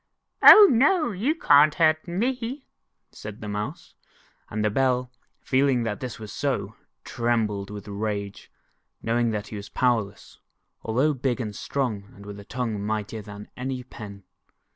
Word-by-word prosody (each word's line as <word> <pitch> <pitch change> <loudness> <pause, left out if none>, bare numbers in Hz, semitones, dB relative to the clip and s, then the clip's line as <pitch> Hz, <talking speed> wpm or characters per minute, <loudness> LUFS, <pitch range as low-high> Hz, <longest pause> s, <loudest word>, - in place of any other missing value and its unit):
"Oh, 420 -1 +11
no, 300 +4 +3
you 230 - -1
cant 150 - +5
hurt 155 -1 +2
me," 245 +8 -3 0.5
said 105 0 -9
the 105 - -7
Mouse, 105 +1 -5 0.6
and 105 0 -2
the 105 - +1
Bell, 125 +1 0 0.3
feeling 130 -2 +2
that 105 -2 -3
this 125 -2 -6
was 105 -2 -9
so, 140 -3 -2 0.3
trembled 110 -4 -1
with 105 0 -9
rage, 100 -1 -5 0.5
knowing 115 +1 +1
that 105 -1 -4
he 105 - -6
was 100 0 -9
powerless, 110 -5 -1 0.4
although 130 +7 +1
big 130 -1 -2
and 105 -4 -4
strong, 115 -8 -3
and 100 - -13
with 100 0 -9
a - - -10
tongue 115 -4 -3
mightier 110 +1 -3
than 105 0 -11
any 130 0 -4
pen. 100 -5 -11
115 Hz, 150 wpm, -25 LUFS, 105-140 Hz, 0.6 s, Oh